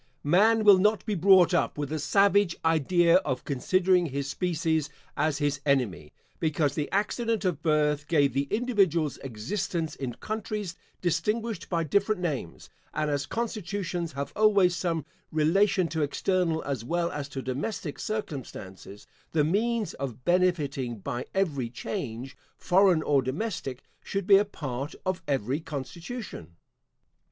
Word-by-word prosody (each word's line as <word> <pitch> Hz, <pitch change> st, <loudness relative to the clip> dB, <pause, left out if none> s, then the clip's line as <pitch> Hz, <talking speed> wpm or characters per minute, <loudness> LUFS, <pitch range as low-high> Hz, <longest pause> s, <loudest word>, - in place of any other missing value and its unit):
Man 215 Hz, +9 st, +4 dB
will 200 Hz, -3 st, +8 dB
not 210 Hz, +2 st, +2 dB
be 215 Hz, -, -1 dB
brought 185 Hz, -1 st, +5 dB
up 165 Hz, -4 st, +1 dB
with 145 Hz, -2 st, -3 dB
the 155 Hz, 0 st, -2 dB
savage 195 Hz, +4 st, +3 dB
idea 165 Hz, +2 st, +4 dB
of 135 Hz, -9 st, -2 dB
considering 180 Hz, +6 st, +2 dB
his 140 Hz, -1 st, -3 dB
species 160 Hz, -2 st, -1 dB, 0.3 s
as 155 Hz, 0 st, +1 dB
his 145 Hz, -2 st, -1 dB
enemy, 120 Hz, -, 0 dB, 0.3 s
because 155 Hz, -3 st, +1 dB
the 150 Hz, 0 st, -2 dB
accident 225 Hz, +2 st, 0 dB
of 170 Hz, -5 st, 0 dB
birth 150 Hz, -2 st, +1 dB
gave 145 Hz, -6 st, +3 dB
the 140 Hz, +2 st, 0 dB
individuals 195 Hz, -, +1 dB
existence 155 Hz, -, -3 dB
in 125 Hz, -3 st, -5 dB
countries 210 Hz, -4 st, -4 dB, 0.3 s
distinguished 210 Hz, +3 st, -1 dB
by 170 Hz, -2 st, 0 dB
different 200 Hz, +6 st, +1 dB
names; 145 Hz, -, -4 dB, 0.3 s
and 155 Hz, -1 st, 0 dB
as 145 Hz, -1 st, -1 dB
constitutions 190 Hz, -7 st, -3 dB
have 140 Hz, +1 st, -5 dB
always 200 Hz, -4 st, +4 dB
some 165 Hz, -2 st, -2 dB, 0.3 s
relation 185 Hz, +5 st, +3 dB
to 160 Hz, -1 st, -2 dB
external 165 Hz, +2 st, 0 dB
as 135 Hz, -5 st, -3 dB
well 170 Hz, +6 st, -1 dB
as 145 Hz, -1 st, -5 dB
to 135 Hz, -1 st, -5 dB
domestic 145 Hz, -, -4 dB
circumstances, 120 Hz, -, -6 dB, 0.3 s
the 155 Hz, -2 st, +3 dB
means 215 Hz, +6 st, 0 dB
of 125 Hz, -3 st, -6 dB
benefitting 150 Hz, -9 st, +1 dB
by 120 Hz, +5 st, -5 dB
every 145 Hz, -11 st, 0 dB
change, 120 Hz, +3 st, -5 dB, 0.2 s
foreign 185 Hz, -3 st, +4 dB
or 140 Hz, -2 st, +3 dB
domestic, 135 Hz, -, -4 dB, 0.2 s
should 195 Hz, -1 st, -3 dB
be 195 Hz, 0 st, +7 dB
a 205 Hz, -, +3 dB
part 140 Hz, -6 st, -5 dB
of 185 Hz, 0 st, -1 dB
every 135 Hz, 0 st, 0 dB
constitution. 165 Hz, -, -7 dB
165 Hz, 140 wpm, -27 LUFS, 140-195 Hz, 0.3 s, will